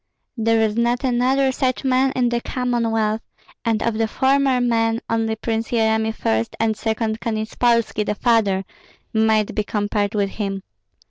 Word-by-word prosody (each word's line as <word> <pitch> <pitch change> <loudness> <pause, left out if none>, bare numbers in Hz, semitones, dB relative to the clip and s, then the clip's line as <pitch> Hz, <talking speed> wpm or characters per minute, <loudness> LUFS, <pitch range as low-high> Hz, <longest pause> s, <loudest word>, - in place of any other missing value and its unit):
There 225 -1 +2
is 215 -1 +1
not 240 +2 +1
another 260 +2 +2
such 255 -1 -1
man 265 0 +2
in 245 -1 +2
the 240 0 -1
Commonwealth; 230 -4 -1 0.4
and 225 -2 0
of 230 -1 -1
the 225 - +2
former 265 +1 +2
men 230 -2 +1
only 225 -1 0
Prince 225 0 -3
Yeremi 220 -1 +1
first, 110 - -1
and 225 -1 +1
second 220 0 -2
Konyetspolski, 230 0 0
the 210 - 0
father, 205 -5 +2 0.5
might 220 -1 +2
be 210 - 0
compared 205 0 -1
with 200 -1 0
him. 195 -2 -4
225 Hz, 150 wpm, -21 LUFS, 215-240 Hz, 0.5 s, There